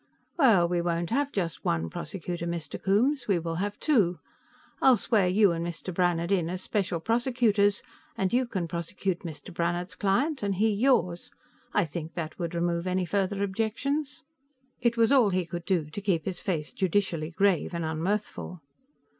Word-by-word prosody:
"Well, 225 - +5
we 175 0 0
won't 170 +1 -1
have 285 +3 +1
just 170 -6 -3
one 80 0 0
prosecutor, 170 - -5
Mr. 170 -2 -4
Coombes, 240 +7 +2
we 195 -4 +3
will 165 -1 -3
have 205 +3 -3
two. 205 - +2 0.6
I'll 260 -2 +6
swear 205 -2 +2
you 200 +1 +4
and 165 0 -2
Mr. 170 +2 -5
Brannhard 175 0 +1
in 175 -4 +2
as 185 +1 -4
special 190 -5 -1
prosecutors, 225 -2 +2 0.3
and 190 +1 0
you 250 0 +2
can 190 -7 -2
prosecute 175 +2 -3
Mr. 170 +2 -9
Brannhard's 175 +1 -1
client, 265 +10 0
and 200 -1 0
he 215 +4 +2
yours. 200 -6 +1 0.4
I 205 - +2
think 160 0 -6
that 160 -1 -5
would 170 -1 -3
remove 170 +1 0
any 185 0 0
further 200 +2 0
objections." 230 +9 -2 0.6
It 235 -1 +1
was 230 +2 +4
all 255 -7 +5
he 185 -2 0
could 170 0 -6
do 175 -6 +1
to 205 - -5
keep 185 -6 0
his 190 - -3
face 160 -6 -2
judicially 180 -4 0
grave 185 0 +1
and 170 -2 -3
unmirthful. 180 +3 -3
185 Hz, 170 wpm, -28 LUFS, 170-210 Hz, 0.6 s, I'll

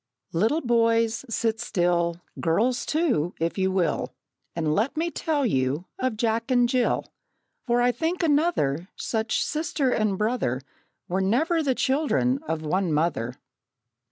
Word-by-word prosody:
Little 225 - +2
boys, 230 -1 +2
sit 225 0 0
still 175 -1 0 0.2
Girls, 235 +11 +1
too, 265 - +1
if 165 +4 -1
you 190 0 +2
will 185 -3 -1 0.4
And 160 -2 0
let 225 - 0
me 335 +2 0
tell 305 -5 0
you 135 - 0
of 255 -4 -1
Jack 230 +2 0
and 245 -2 +4
Jill; 250 0 +1 0.6
For 240 0 +3
I 245 - +4
think 335 +7 -2
another 285 - +1
Such 220 -1 -1
sister 300 -3 -1
and 215 -4 +1
brother 210 - 0 0.5
Were 185 +2 0
never 310 - +2
the 270 -4 +1
children 270 -1 +1
of 160 -1 -2
one 180 +3 0
mother! 150 -6 0
225 Hz, 140 wpm, -25 LUFS, 175-265 Hz, 0.6 s, and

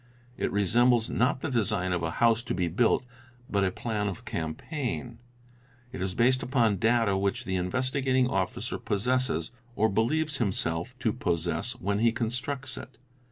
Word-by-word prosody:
It - - -1
resembles, 115 +4 +3
not 125 +2 +1
the 160 - -2
design 105 -6 0
of 90 - -1
a 80 - -1
house 115 -1 +4
to - - -2
be 90 -1 0
built, 115 +8 +2 0.4
but 100 -1 +1
a 95 - +3
plan 105 +1 -2
of 95 -4 -5
campaign. 120 - -4 0.7
It 130 - -6
is 95 0 -2
based 125 +2 +3
upon 115 -6 +2
data 115 -1 +3
which 100 0 -1
the 95 - -1
Investigating 130 +6 +1
Officer 95 -7 -2
possesses, 110 -5 0 0.2
or 110 +1 +3
believes 145 +8 +1
himself 95 0 -1
to 110 - +1
possess, 85 +7 -1
when 100 +2 -2
he 115 +1 +4
constructs 125 +4 -3
it. 130 - -10
115 Hz, 160 wpm, -28 LUFS, 95-125 Hz, 0.7 s, house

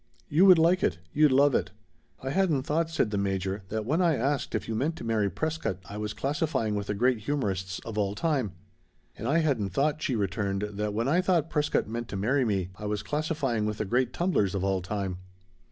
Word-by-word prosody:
"You 175 +7 +5
would 185 -2 +9
like 170 +3 +4
it. - - +1 0.2
You'd 150 -1 +5
love 140 +1 +5
it." 95 -3 +1 0.5
"I 135 - -2
hadn't 165 -6 +2
thought," 160 +3 0
said 155 -9 0
the 100 - 0
Major, 95 0 -1
"that 110 0 -2
when 155 +9 +1
I 170 -3 +3
asked 135 +3 -1
if - - -2
you 115 - -2
meant 140 +9 0
to - - -8
marry 110 -3 +1
Prescott 160 - -2
I 100 - -8
was 105 0 -4
classifying 140 -6 -1
with 100 -1 -3
the 105 - -1
great 125 +2 +2
humorists 100 -7 -2
of 110 -2 -4
all 100 0 0
time." 130 - 0 0.6
"And 110 - -5
I 145 +5 +3
hadn't 130 -11 0
thought," 150 - 0
she 135 -5 0
returned, 100 -1 -1
"that 105 0 -3
when 115 +3 0
I 170 +6 +3
thought 170 -4 +1
Prescott 150 -1 +1
meant 115 +2 -4
to 100 - -5
marry 125 +7 +2
me 95 -5 0
I 105 - -5
was 105 0 -2
classifying 135 -3 -1
with 105 0 -3
the 110 - -2
great 125 +4 +1
tumblers 125 - +1
of 95 - -1
all 95 -1 +1
time!" 95 -1 -3
115 Hz, 220 wpm, -28 LUFS, 100-150 Hz, 0.6 s, would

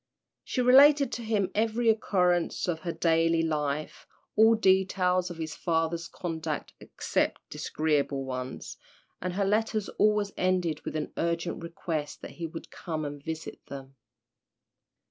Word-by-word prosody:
She 255 - -1
related 280 +3 +7
to - - -4
him 210 -4 0
every 225 +2 +1
occurrence 180 -7 +2
of 170 -3 -1
her 170 0 -3
daily 165 0 +2
life, 150 -1 -2 0.3
all 220 +1 +6
details 190 -3 +2
of 175 - -8
his 160 -1 -4
father's 165 0 -1
conduct 165 -3 -4
except - - -1
disagreeable 145 -3 -1
ones, 130 0 -6 0.4
and 180 0 -2
her 200 +2 0
letters 215 +1 0
always 210 -1 +3
ended 180 -3 0
with - - -4
an 155 -1 -3
urgent 170 0 -1
request 165 -3 -4
that - - -7
he 170 -1 -5
would 165 +1 -9
come 160 -3 -4
and 145 -1 -7
visit 160 0 -6
them. 135 -1 -9
170 Hz, 140 wpm, -28 LUFS, 160-200 Hz, 0.4 s, related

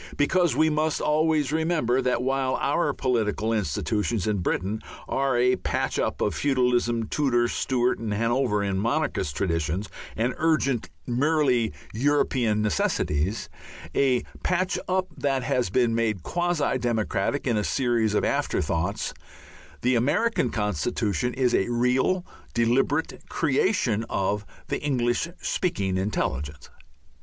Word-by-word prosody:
(Because 175 +3 +2
we 160 0 +3
must 155 0 0
always 155 -1 +2
remember 155 -6 +1
that 125 -1 0
while 135 0 0
our 150 +1 +1
political 115 -4 0
institutions 105 +2 -1
in 105 -2 0
Britain 95 +4 -1 0.3
are 135 -2 +1
a 125 +1 +3
patch - - -1
up - - -1
of - - +1
feudalism, 125 -4 +1
Tudor, 120 -4 +2
Stuart, 125 0 0
and 110 -2 -3
Hanoverian 105 -3 +1
monarchist 115 - -1
traditions 85 +3 -1 0.3
and 120 +3 0
urgent 145 -7 +1 0.2
merely 130 -3 +2 0.2
European 120 -4 +1
necessities, 90 0 0 0.5
a 130 -3 +2 0.2
patch 185 +1 0
up 185 0 +1
that 135 -2 0
has 125 -5 0
been 120 +3 +2
made 110 -6 0
quasi 175 - 0
democratic 115 +1 -1
in 120 -4 +1
a 105 - +1
series 115 -4 +1
of - - +2
after - - 0
thoughts, 90 +6 -1 0.7
the 125 +1 +3
American 140 - +2
Constitution 105 - -1
is 125 -2 +2
a 95 - +2
real, 125 +10 +1 0.3
deliberate 125 +6 +1
creation 135 - +1
of 100 +1 -1 0.2
the - - -2
English 125 -1 0 0.2
speaking 120 - -1
intelligence.) 75 -7 -3
120 Hz, 125 wpm, -25 LUFS, 105-145 Hz, 0.7 s, we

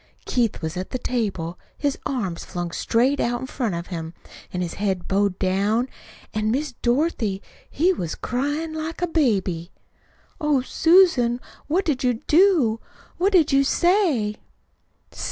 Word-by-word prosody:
Keith 235 -8 0
was 160 +2 -3
at 185 - -4
the 255 - -2
table, 195 -9 -2 0.2
his 285 -2 0
arms 195 -11 -3
flung 175 -2 -4
straight 250 +10 +1
out 240 0 0
in - - -3
front 240 -7 -2
of 170 0 -4
him, 165 0 -5 0.4
an' 180 - -3
his 175 -2 -3
head 190 -4 -1
bowed 195 -1 +1
down. 200 +6 +1 0.5
An', 215 0 0
Miss 275 +5 0
Dorothy, 240 - +1 0.3
he 355 +6 +2
was 170 - -4
cryin' 290 +6 -2
like 315 +2 -4
a - - +2
baby." 195 - 0 0.7
"Oh, 300 -3 +2
Susan, 300 -6 +4 0.3
what 355 +7 +1
did 275 -5 0
you 250 -1 +2
do? 300 - +3 0.4
What 385 +3 +3
did 325 -5 +5
you 275 0 +5
say?" 305 - +2
245 Hz, 150 wpm, -23 LUFS, 195-300 Hz, 0.7 s, did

